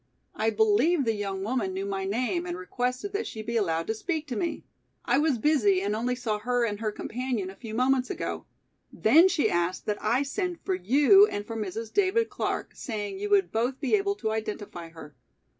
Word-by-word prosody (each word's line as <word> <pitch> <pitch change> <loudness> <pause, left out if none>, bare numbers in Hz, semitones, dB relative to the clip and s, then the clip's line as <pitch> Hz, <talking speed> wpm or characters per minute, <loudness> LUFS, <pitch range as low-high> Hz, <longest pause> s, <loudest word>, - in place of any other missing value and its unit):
I 220 - +1
believe 355 - +3
the 225 - +2
young 195 -2 -3
woman 215 -4 -1
knew 195 +1 -3
my 195 -1 -3
name 195 -4 -1
and 175 0 -4
requested 250 - -3
that 420 +3 -2
she 220 - -6
be 235 +2 -4
allowed 165 -7 +1
to 220 - -1
speak 315 - -3
to 245 - -3
me. 340 -2 -2 0.4
I 245 +3 +3
was 300 -4 +2
busy 220 -8 +3
and 205 +1 0
only 245 +3 -1
saw 225 -4 -2
her 245 +2 +1
and 205 -2 -3
her 220 -1 -1
companion 235 -4 -3
a - - -14
few 220 -1 -8
moments 255 +1 +2
ago. - - -4 0.4
Then 315 +11 +5
she 345 -5 +2
asked 175 +1 -1
that 210 -1 -3
I 240 +6 +2
send 350 +5 -3
for 190 - 0
you 285 - +6
and 205 - -4
for 225 - -6
Mrs. 220 +1 -5
David 410 +3 +2
Clark, - - -2
saying 205 -5 -5
you 205 +1 -3
would 195 -4 +3
both 245 +4 -1
be 275 - -2
able 400 -1 +2
to 220 - -2
identify 210 -6 -5
her. 155 -3 -12
225 Hz, 210 wpm, -27 LUFS, 200-270 Hz, 0.4 s, you